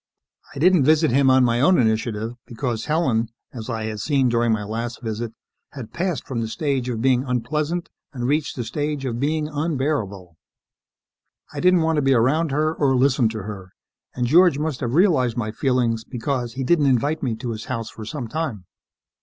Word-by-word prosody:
I - - -7
didn't 175 +1 +4
visit 155 +1 +4
him 135 +1 +4
on 130 0 +5
my 120 0 +1
own 180 +6 +5
initiative 110 -1 0
because 115 -2 -3
Helen, 130 -8 +1 0.3
as 115 -2 -7
I 115 -2 -3
had 110 -1 -4
seen 135 +2 +2
during 120 0 +2
my 110 -2 0
last 115 +3 -4
visit, 110 0 -3 0.4
had 130 -6 -9
passed 175 -6 -2
from 120 -3 -2
the 115 - -2
stage 135 0 -2
of 115 -2 -3
being 130 -1 +3
unpleasant 150 +7 -2 0.2
and 125 -3 -4
reached 150 +3 0
the 125 - -3
stage 145 +2 -3
of 120 -2 -3
being 150 +2 0
unbearable. 135 - -2 1.2
I - - -5
didn't 180 -1 +4
want 160 -1 +1
to - - +3
be 135 -1 +3
around 145 +8 +2
her 155 +3 +1
or 140 -4 +1
listen 125 -2 +3
to 110 -2 -5
her, 95 -3 -8 0.4
and 125 - 0
George 170 +3 +5
must 150 -3 -2
have 120 +1 -2
realized 150 - +3
my 110 -2 -2
feelings 120 -2 0
because 125 -1 -3
he 135 +2 -3
didn't 150 +1 +3
invite 140 +5 +1
me 125 -5 -1
to 115 +2 -5
his 110 -1 -6
house 115 -3 -4
for 110 - -9
some 125 +2 -5
time. 120 - -4
130 Hz, 195 wpm, -22 LUFS, 115-150 Hz, 1.2 s, on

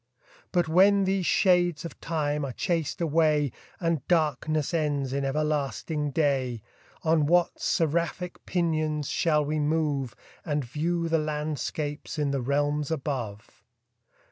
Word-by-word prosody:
But 175 -3 +2
when 195 +4 +5
these 190 -2 0
shades 175 -4 +3
of 165 - -9
time 150 -3 -1
are 135 - -3
chas'd 170 0 -1
away, 155 -3 +2 0.3
And 165 -4 0
darkness 155 -1 +1
ends 145 -5 0
in 140 0 -1
everlasting 150 +1 -1
day, 130 -6 0 0.4
On 160 -2 +3
what 175 +1 +2
seraphic 170 +2 -1
pinions 155 -4 0
shall 150 -3 +2
we 155 +1 -1
move, 145 -4 0 0.3
And 145 -4 -1
view 165 +6 -1
the 165 0 +2
landscapes 150 0 -3
in 145 -2 0
the 140 -2 -1
realms 145 +2 0
above? 125 -11 -4
155 Hz, 125 wpm, -27 LUFS, 145-165 Hz, 0.4 s, when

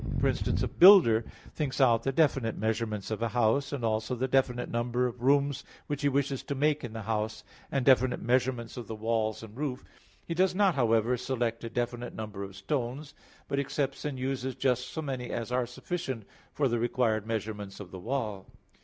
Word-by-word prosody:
For - - +3
instance, - - 0
a - - +1
builder 170 - +7 0.3
thinks 145 -4 -2
out 120 -4 +5
the 135 - 0
definite 135 -6 +2
measurements 110 -1 -2
of 110 - -3
a 115 - +2
house, 120 +4 +1
and 135 -5 -2
also 110 +2 0
the 130 +2 -1
definite 125 -2 +1
number 120 +1 0
of 125 -1 -4
rooms 140 +1 +2 0.2
which 145 -1 -3
he 145 - +3
wishes 140 -1 0
to 140 - -4
make 150 +2 +1
in 120 -3 -6
the 110 -1 -5
house; 110 0 -2 0.3
and 135 -3 0
definite 130 -1 +4
measurements 120 -1 0
of 120 -3 -6
the 110 - -5
walls 110 0 -1
and 110 -1 -11
roof; 135 -2 -3 0.4
he 170 - -3
does 185 +2 +2
not, 195 -2 +4
however, 120 -2 +2
select 120 -2 -2
a 115 - -4
definite 120 +1 -3
number 105 -2 -6
of 100 -1 -7
stones, 130 +7 -3 0.3
but 140 0 -1
accepts 140 0 -2
and 145 -3 -3
uses 130 0 -2
just 125 -1 0
so 160 - -4
many 130 -4 -4
as 115 0 -4
are 125 -1 +1
sufficient 130 - -4 0.3
for 145 - +1
the 120 -1 0
required 115 -3 0
measurements 105 -3 -4
of 100 -3 -9
the 95 - -7
wall. 110 -3 -3
125 Hz, 200 wpm, -29 LUFS, 110-135 Hz, 0.4 s, builder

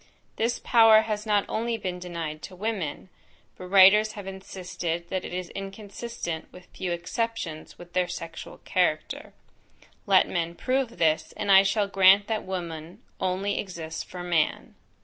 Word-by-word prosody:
This 230 +2 0
power 225 -2 +6
has 215 -1 -3
not 205 -1 +2
only 230 +1 -1
been 180 -4 -4
denied 165 -3 -5
to 185 - -9
women; 190 -5 -3 0.5
but 185 - -9
writers 200 +3 +6
have 205 -2 -8
insisted 180 -3 -5
that 185 -1 -2
it - - -7
is 180 0 -4
inconsistent, 195 -3 -6
with 180 0 -14
a - - -33
few 185 -2 -3
exceptions, 175 -1 -4
with 175 0 -13
their 180 -1 +1
sexual 165 -2 -7
character. - - 0 0.8
Let 195 -2 +5
men 170 -1 -2
prove 255 0 -1
this, 160 -1 +1
and 205 -2 0
I 190 0 +9
shall 200 +1 +1
grant 195 0 +6
that 220 0 -2
woman 170 -3 -6 0.2
only 190 +2 -1
exists 165 -4 -5
for 180 -1 -8
man. 170 -3 0
190 Hz, 155 wpm, -26 LUFS, 175-210 Hz, 0.8 s, I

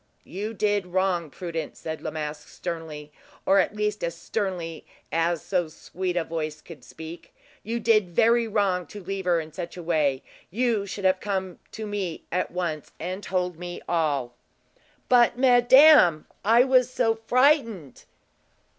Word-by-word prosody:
"You 210 +5 -5
did 205 -2 0
wrong, 180 -3 0
Prudence," 165 0 -6
said 160 -1 -6
La - - -3
Masque, 150 -1 -6
sternly, 160 -4 -7 0.3
or 195 +1 +5
at 195 - +1
least 210 -1 -2
as 170 0 -2
sternly 175 -4 -4 0.3
as 165 0 0
so 180 -3 0
sweet 180 +3 -5
a 170 - +1
voice 155 -2 -4
could 160 -7 -13
speak; 160 +2 -11 0.3
"you 230 +3 -3
did 215 -4 +3
very 230 +6 +3
wrong 195 -5 0
to 210 - -9
leave 195 +1 -4
her 175 -2 +3
in 155 -1 -8
such 170 +3 -6
a 175 - -7
way. 150 -5 +1 0.3
You 225 -1 0
should 195 0 -5
have 185 0 +3
come 190 -3 -3
to 220 - -5
me 200 -5 -4
at 180 +1 -1
once, 170 -4 -4
and 185 +4 -4
told 180 -4 -2
me 175 0 -6
all." 145 -7 0 0.7
"But, 245 -1 +4
madame, 250 - +6 0.2
I 230 +4 +5
was 255 -1 +3
so 245 -3 +1
frightened!" 245 - +2
185 Hz, 155 wpm, -25 LUFS, 165-215 Hz, 0.7 s, madame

